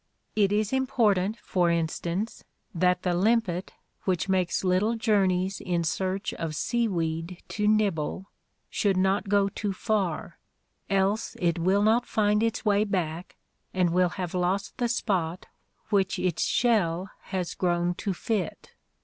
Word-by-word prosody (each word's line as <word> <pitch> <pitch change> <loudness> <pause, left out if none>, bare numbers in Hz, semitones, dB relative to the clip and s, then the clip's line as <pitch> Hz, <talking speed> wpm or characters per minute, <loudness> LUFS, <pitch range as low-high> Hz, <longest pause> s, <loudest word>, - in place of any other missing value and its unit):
It 205 -2 +3
is 210 +2 +1
important, 220 -6 +2
for 175 -2 +1
in 170 -1 +2
stance, 175 +7 -4 0.3
that 180 +1 +2
the 180 - +1
limpet 190 -1 +1 0.3
which 185 -1 0
makes 185 -2 +1
little 190 +5 +2
journeys 195 -4 +1
in 175 -3 0
search 185 +5 -1
of 160 -2 -4
seaweed 170 -6 -1
to 210 -1 -1
nibble 195 -4 +1 0.4
should 200 -4 +1
not 190 +1 +1
go 200 -1 +4
too 200 0 -3
far, 190 -5 -2 0.5
else 195 +3 +1
it 170 -1 +1
will 190 +4 +3
not 230 +3 +3
find 210 0 +2
its 230 0 -1
way 205 0 +4
back, 180 -4 -3 0.4
and 180 -2 +2
will 180 +1 +3
have 180 -2 -3
lost 185 +2 -1
the 240 - +2
spot 185 -7 -1 0.5
which 200 0 +2
its 180 -3 0
shell 195 -6 +1
has 185 -3 -3
grown 175 -1 +1
to 195 +2 -3
fit. 190 -1 -3
190 Hz, 140 wpm, -27 LUFS, 175-210 Hz, 0.5 s, go